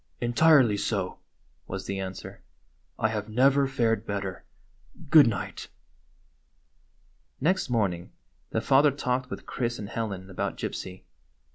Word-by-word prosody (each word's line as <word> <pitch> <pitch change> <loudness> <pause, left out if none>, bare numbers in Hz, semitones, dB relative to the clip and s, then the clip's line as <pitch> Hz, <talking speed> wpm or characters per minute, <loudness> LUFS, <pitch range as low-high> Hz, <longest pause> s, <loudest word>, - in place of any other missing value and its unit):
"Entirely 120 -2 +4
so," 100 -4 -2 0.5
was 95 0 -5
the 100 0 -3
answer. 95 -1 -7 0.6
"I 110 - +1
have 105 -1 -4
never 135 +4 +4
fared 115 -5 +1
better. 100 -4 -4 0.7
Good 155 -5 +9
night." 105 -5 -4 1.7
Next 185 +2 +1
morning 95 -7 -1 0.4
the 110 - -1
father 140 +4 +5
talked 130 -2 -2
with - - -7
Chris 120 -1 -2
and 105 -1 -7
Helen 100 -5 -4
about - - -3
Gypsy. 95 0 -5
115 Hz, 120 wpm, -27 LUFS, 100-130 Hz, 1.7 s, Good